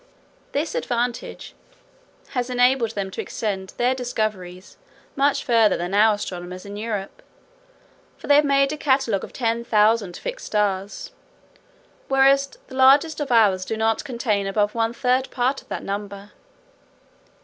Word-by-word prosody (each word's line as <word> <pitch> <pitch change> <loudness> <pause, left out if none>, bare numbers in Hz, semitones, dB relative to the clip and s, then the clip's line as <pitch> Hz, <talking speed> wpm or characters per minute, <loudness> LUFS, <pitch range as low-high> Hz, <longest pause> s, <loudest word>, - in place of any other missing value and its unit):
This 300 +3 -2
advantage 245 - -3 0.8
has 250 -2 -2
enabled 245 -2 +2
them 195 -2 -3
to - - -4
extend 195 -4 -4
their 245 +2 +2
discoveries 215 -7 -4 0.4
much 280 +1 +1
further 230 -3 +3
than 175 +2 -4
our 215 +1 +5
astronomers 180 -2 -7
in 200 0 -8
Europe; 210 -2 -5 1.0
for - - -12
they 290 - +4
have 300 - +5
made 275 0 +2
a - - -5
catalogue 260 -9 +1
of - - -8
ten 230 -1 -1
thousand 215 -4 +2
fixed - - -6
stars, 205 -2 -2 1.0
whereas 275 +1 +4 0.2
the 260 - -12
largest 280 +5 +5
of 290 -3 -3
ours 205 -5 +4
do 220 +4 -4
not 225 0 0
contain 225 -6 -1
above 205 +1 0
one 225 -1 0
third 255 +2 0
part 255 +2 -1
of - - -26
that - - -5
number. 200 0 -6
230 Hz, 145 wpm, -23 LUFS, 205-265 Hz, 1.0 s, our